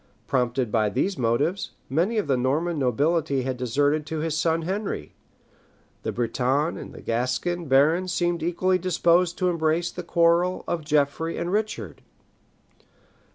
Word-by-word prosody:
Prompted 125 -2 0
by 110 -2 +2
these 190 - 0
motives, 140 - 0
many 175 - 0
of 210 - +1
the 140 -3 +1
Norman 150 +6 0
nobility 140 +2 +1
had 130 0 -2
deserted 145 +5 +1
to 160 - -3
his 155 0 -1
son 165 0 +1
Henry; 195 +4 -3 0.9
the - - -3
Breton 130 +6 0
and - - -10
Gascon 130 +9 -1
barons 155 +7 +3
seemed 175 -1 0
equally 185 +3 +1
disposed 175 0 +2
to 185 - +1
embrace 165 0 0
the 180 - -6
quarrel 170 +1 +2
of 170 -2 -2
Geoffrey 150 +2 0
and 175 - -2
Richard. 215 +1 -3
160 Hz, 140 wpm, -25 LUFS, 135-175 Hz, 0.9 s, barons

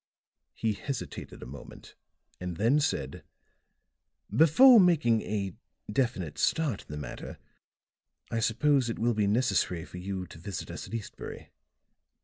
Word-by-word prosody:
He 110 -1 0
hesitated 130 +6 -6
a - - -8
moment, 65 +1 -11 0.5
and 90 -2 -5
then 115 +8 +3
said: 145 - -2 1.1
"Before 225 - +8
making 155 - +4
a 100 -3 -3 0.4
definite 105 - -1
start 150 - +1
in - - -20
the 75 - -5
matter, 75 - -7 0.9
I 115 - 0
suppose 125 +3 +2
it 115 - -3
will 120 +1 +1
be 105 -2 +1
necessary 95 -6 +1
for 90 - -9
you 95 0 -4
to 80 - -13
visit 95 +2 -6
us - - -7
at - - -6
Eastbury. 110 -3 -7
110 Hz, 135 wpm, -29 LUFS, 95-135 Hz, 1.1 s, Before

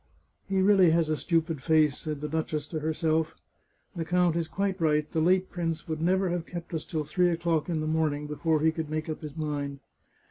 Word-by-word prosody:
" - - -41
He 190 -1 +2
really 190 -3 +6
has 165 -1 +2
a 155 - +2
stupid 165 -2 0
face," 155 -2 +3
said 150 -2 -5
the 150 - -2
duchess 155 -1 -2
to 160 - -3
herself. 160 +1 0 0.3
" - - -42
The 170 - -2
count 175 0 +2
is 170 -1 -1
quite 195 0 -2
right, 150 -1 +2
the 160 - 0
late 185 +3 +2
prince 165 -3 -3
would 160 -1 -3
never 185 +2 +2
have 175 -1 -2
kept 175 -1 -7
us 160 - -3
till 155 -3 -2
three 175 +4 +2
o'clock 170 -1 0
in 160 -2 0
the - - -2
morning 155 -2 0
before 150 +1 0
he 160 +1 +4
could 160 -1 -4
make 155 +1 -3
up 155 - -4
his 150 0 -8
mind." 145 -2 -3
160 Hz, 225 wpm, -28 LUFS, 155-175 Hz, 0.3 s, really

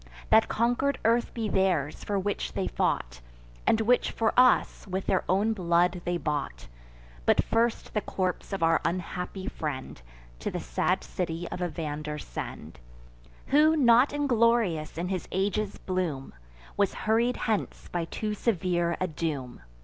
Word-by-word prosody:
That 220 - +6
conquer'd 245 +4 +1
earth 235 +1 +3
be 225 -2 -3
theirs, 185 -7 0
for 205 - -1
which 200 +1 -2
they - - -1
fought, 60 +1 -1 0.5
And 225 - +4
which 245 +3 +3
for 225 - 0
us 250 -3 +4
with 190 0 -3
their 190 - +1
own 205 +5 +2
blood 175 -2 +2
they 175 0 0
bought; 150 -4 -3 0.6
But - - +4
first 230 0 0
the 210 - +1
corpse 185 0 -3
of 195 -4 -2
our 165 0 +4
unhappy 180 +2 -3
friend 130 - -5 0.4
To - - -3
the - - -4
sad - - 0
city 170 -1 -3
of 180 - -5
Evander 155 -3 -3
send, - - -7 0.7
Who, 310 +3 +5
not 245 -1 +5
inglorious, 230 - +1
in 175 +2 -2
his 185 -2 -3
age's 200 +2 -1
bloom, 175 -8 -3 0.4
Was 200 -2 +1
hurried 230 +3 +2
hence 220 -3 -2
by 175 -1 -1
too 210 +5 -3
severe 175 -5 0
a 185 - +1
doom." 150 -7 -4
185 Hz, 150 wpm, -28 LUFS, 165-225 Hz, 0.7 s, That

